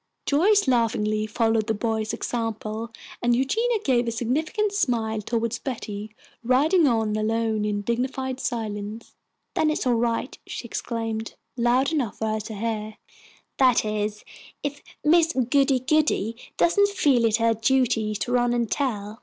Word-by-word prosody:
Joyce 395 +6 +3
laughingly 215 -3 +1
followed 225 0 +1
the 220 - 0
boys' 220 0 -1
example, 225 -1 -3 0.3
and 240 0 +3
Eugenia 450 - +1
gave 245 -3 +2
a - - 0
significant 310 - -1
smile 230 - 0
toward 230 +1 -2
Betty, 215 -4 -5 0.3
riding 295 +7 +4
on 225 -4 +1
alone 220 0 0
in 205 -1 -1
dignified 260 +3 -2
silence. 220 -2 -4 0.4
"Then 310 - +2
it - - +2
is - - -3
all 250 - +3
right," 235 +2 -1
she - - -6
exclaimed, 225 -1 -4 0.2
loud 245 +3 +2
enough 255 -9 -1
for 220 - -1
her 215 0 -1
to 215 +1 -7
hear, 215 0 -3 0.6
"that 255 -4 +4
is, 210 0 -2 0.4
if 290 0 -4 0.2
Miss 330 +2 +4
Goody 265 +1 +2
goody 265 -5 +1 0.2
doesn't 405 +4 +4
feel 285 -11 +2
it 220 -2 +3
her 230 0 +3
duty 225 -2 +1
to 240 - -3
run 245 -1 +2
and 235 -2 -1
tell." 215 -5 -2
235 Hz, 150 wpm, -25 LUFS, 220-265 Hz, 0.6 s, riding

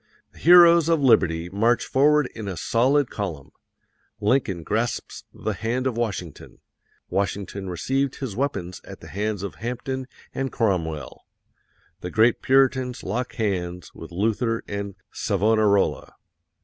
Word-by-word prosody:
The - - -18
heroes 170 -1 +7
of 165 -1 +3
liberty 85 - +3
march 115 +5 +1
forward 150 +2 +3
in 110 -2 -7
a 95 -3 -4
solid 130 - +2
column. 85 -10 -5 0.7
Lincoln 105 -5 +1
grasps 115 +6 -3
the - - -4
hand 120 +3 -2
of 130 -3 0
Washington. 100 -9 -4 0.5
Washington 100 0 -2
received 135 +9 -1
his 125 -8 -5
weapons 95 -10 -3
at - - -11
the - - -11
hands 105 0 -3
of 100 - -6
Hampden 125 +2 -4 0.3
and 135 -1 -2
Cromwell. 85 - -2 0.7
The 90 - -6
great 110 +4 +3
Puritans 130 -1 +2
lock 120 +6 -3
hands 90 -6 -3
with 80 - -11
Luther 115 +5 0
and 100 -1 -5 0.2
Savonarola. 105 0 +1
110 Hz, 130 wpm, -24 LUFS, 95-130 Hz, 0.7 s, heroes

